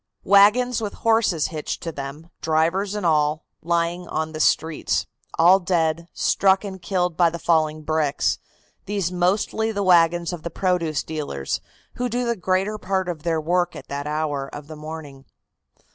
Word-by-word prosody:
Wagons 215 +5 +5
with 210 -2 -3
horses 225 -8 +3
hitched 155 -3 -5
to 165 - -3
them, 145 +4 -8
drivers 170 +6 +1
and 205 -3 -3
all, 155 -1 +2 0.2
lying 170 +1 -1
on 155 0 -2
the 155 - -6
streets, 160 +1 +1 0.3
all 180 +4 +6
dead, 170 -2 0
struck 195 0 +2
and 190 -2 -7
killed 180 -2 -1
by 170 0 +4
the 170 - -5
falling 155 -2 +1
bricks, 155 -2 0 0.5
these 200 -3 -1
mostly 200 +5 +1
the 200 -2 -2
wagons 175 -1 +4
of 175 - -6
the 170 - -5
produce 170 -4 0
dealers, 145 - -4 0.4
who 250 0 -1
do 245 +2 -1
the 235 0 0
greater 190 +2 0
part 190 -1 -1
of 170 -4 -4
their 165 0 0
work 175 +3 0
at - - -10
that 140 +1 -4
hour 150 -2 -2
of 145 - -8
the 155 +1 -9
morning. 150 -3 -8
170 Hz, 165 wpm, -23 LUFS, 155-190 Hz, 0.5 s, all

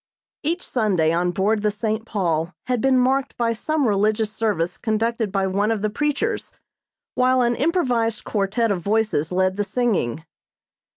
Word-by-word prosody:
Each 335 +4 -2
Sunday 190 -10 +1
on 175 +1 +1
board 205 +4 +1
the 210 - +2
"St. 220 +1 -3
Paul" 170 -5 -1
had 250 -3 0
been 265 -1 +3
marked 260 +2 +1
by 230 -1 +1
some 295 +4 0
religious 210 +1 +1
service 205 -6 -1
conducted 225 -1 -1
by 195 -1 0
one 200 +3 0
of 220 -2 -1
the 215 - 0
preachers, 295 - -1 0.6
while 255 0 +3
an 240 0 +1
improvised 245 -8 0
quartet 210 +2 0
of 185 -3 -1
voices 205 -6 0
led 185 +1 +1
the 205 - +1
singing. 195 - -1
215 Hz, 160 wpm, -22 LUFS, 195-245 Hz, 0.6 s, been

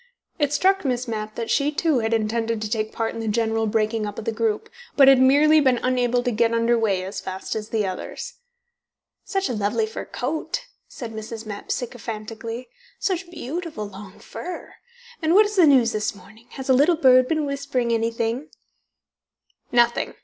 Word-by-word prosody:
It 290 -2 +1
struck 385 +5 +2
Miss 250 -2 -1
Mapp 215 -1 -4
that 230 -1 -3
she, 285 +1 +2
too, 300 -3 +1
had 225 0 -1
intended 225 0 0
to - - -2
take 215 0 -2
part 225 -1 -2
in - - -6
the 225 - -4
general 225 0 +1
breaking 215 0 0
up 205 - -7
of 220 - -6
the - - 0
group, 220 -1 -1 0.3
but 275 -2 +7
had 270 -1 +8
merely 295 +4 +6
been 260 -4 +3
unable 245 -1 +1
to 245 - 0
get 230 +1 +2
under 230 +1 +3
way 205 -5 +1
as 195 +1 -5
fast 190 0 -5
as 215 0 -4
the 215 -2 0
others. 185 -1 -5 0.9
"Such 390 -1 -1
a - - -2
lovely 215 +1 0
fur 220 - -6
coat," 310 - -3 0.3
said 230 -3 -8
Mrs. 220 +1 -7
Mapp 205 -1 -8
sycophantically. 230 0 -5 0.3
"Such 370 -2 -2
beautiful 320 - -5
long 195 0 -11
fur! 360 -1 -8 0.5
And 320 +2 +2
what 425 +2 +7
is 415 0 -4
the 355 -5 +6
news 255 -5 +5
this 210 -1 -2
morning? 210 +5 -17
Has 265 - -7
a 265 - +5
little 300 +6 +4
bird 255 -4 +6
been 310 0 0
whispering 280 -4 -1
anything?" 230 +4 -1
230 Hz, 180 wpm, -23 LUFS, 220-280 Hz, 0.9 s, had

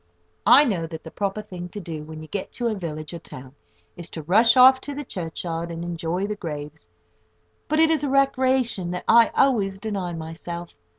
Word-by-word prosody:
I 285 +4 +8
know 180 - -1
that 160 -1 -8
the 160 - -10
proper 205 +1 -3
thing 180 -2 -8
to 205 - -7
do, 160 -5 -6
when 155 0 -9
you - - -10
get 195 +4 -5
to 240 -1 -1
a - - -1
village 155 -5 -6
or 170 - -6
town, 130 -3 -11 0.4
is 175 -2 -8
to 160 - -7
rush 225 - +5
off 260 +1 +8
to 285 - -6
the 290 - -4
churchyard, 170 - -4
and 170 0 -5
enjoy 175 +2 -2
the 210 +1 -3
graves; 150 - -7 0.8
but 310 +1 +1
it 320 0 +5
is 310 -3 +1
a 285 - 0
recreation 260 -7 +1
that 180 0 -4
I 230 0 +6
always 205 -8 +2
deny 195 -4 -4
myself. 165 +1 -6
180 Hz, 200 wpm, -24 LUFS, 165-235 Hz, 0.8 s, I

